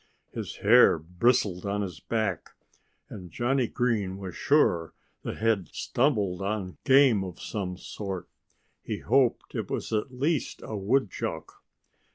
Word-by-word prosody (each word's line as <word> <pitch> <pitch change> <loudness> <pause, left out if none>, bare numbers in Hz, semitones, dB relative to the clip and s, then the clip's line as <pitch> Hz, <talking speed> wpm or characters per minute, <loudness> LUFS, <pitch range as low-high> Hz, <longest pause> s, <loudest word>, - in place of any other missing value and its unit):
His - - -6
hair 120 -2 +6
bristled 90 +3 +1
on 100 +1 -1
his 90 -6 -6
back. 110 -7 -2 0.5
And 90 -3 -9
Johnnie 125 - +1
Green 110 -7 -1
was 95 -2 -7
sure 90 - +2 0.3
that - - -4
they - - -12
had 110 -5 +1
stumbled 105 -9 0
on 95 -2 -3
game 130 -7 +5
of 90 -3 -8
some 90 -4 -4
sort. 95 -1 -6 0.5
He - - -4
hoped - - +1
it - - -4
was - - -3
at 110 +4 -1
least 140 +4 -1
a 110 - -5
woodchuck. 105 +2 -1
105 Hz, 140 wpm, -27 LUFS, 95-125 Hz, 0.5 s, hair